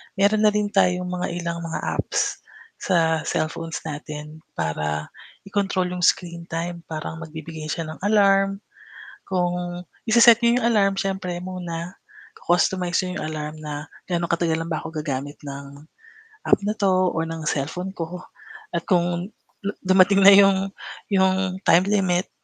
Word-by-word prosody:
Meron 205 +2 +3
na - - +5
rin 210 -1 0
tayong 180 -2 +2
mga 180 0 -2
ilang 170 -1 -3
mga 165 -1 -4 0.2
apps - - -1 0.4
sa 165 -3 +2
cellphones 165 +1 -2
natin 150 0 -7 0.2
para 75 -1 -2 0.3
i-control 195 -2 -1
'yong 180 0 -4
screen 170 -1 +1
time 170 +1 -3
parang 160 0 -5
magbibigay 160 -1 -7
siya 165 - -2
ng 155 - -10
alarm 195 -1 +3 0.6
kung 180 -1 -2 0.2
i-se-set 235 0 +7
niyo 235 +1 +4
'yong 235 - +1
alarm 205 -4 +3
siyempre 190 -2 -2
muna-customize 180 0 -2
niyo 180 - -4
'yong - - -3
alarm 150 0 -5
na 150 0 -5 0.2
gaano 170 -1 0
katagal 165 -1 +1
lang 165 - -4
ba - - -2
ako 160 - -7
gagamit 145 -1 -4
ng 140 +1 -9 0.6
app - - +5
na 210 - +1
'to 185 -3 +2
o 165 - 0
ng 165 0 -4
cellphone 160 +7 -2
ko 180 +1 -6 0.5
at 170 - 0
kung 175 0 +1 0.6
dumating 190 +1 +5
na 200 - +10
yung 195 -1 +6 0.4
yung 190 -1 +2
time 175 - +6
limit 190 -3 +1
175 Hz, 145 wpm, -23 LUFS, 160-195 Hz, 0.6 s, na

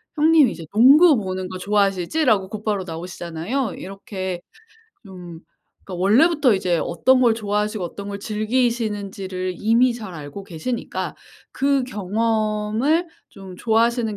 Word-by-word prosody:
형님 310 -3 +5
이제 165 - -8
농구 280 +8 +6
보는 185 -2 -4
거 185 - -6
좋아하시지?"라고 200 - +1
곧바로 210 -2 -3
나오시잖아요. 175 +7 -4
이렇게 190 -1 -6 0.7
좀 175 -3 -10 0.5
그러니까 180 -2 -6
원래부터 270 - +4
이제 180 -3 0
어떤 255 +10 +2
걸 235 -3 +4
좋아하시고 210 -2 -2
어떤 200 +4 -7
걸 200 0 -5
즐기시는지를 210 -4 -2
이미 235 +4 +3
잘 215 -6 -8
알고 150 +5 -8
계시니까 195 +7 -4 0.4
그 275 -1 +1
경험을 220 - 0 0.2
좀 195 -2 -12
좋아하시는 230 0 +1
210 Hz, 320 characters per minute, -21 LUFS, 185-240 Hz, 0.7 s, 농구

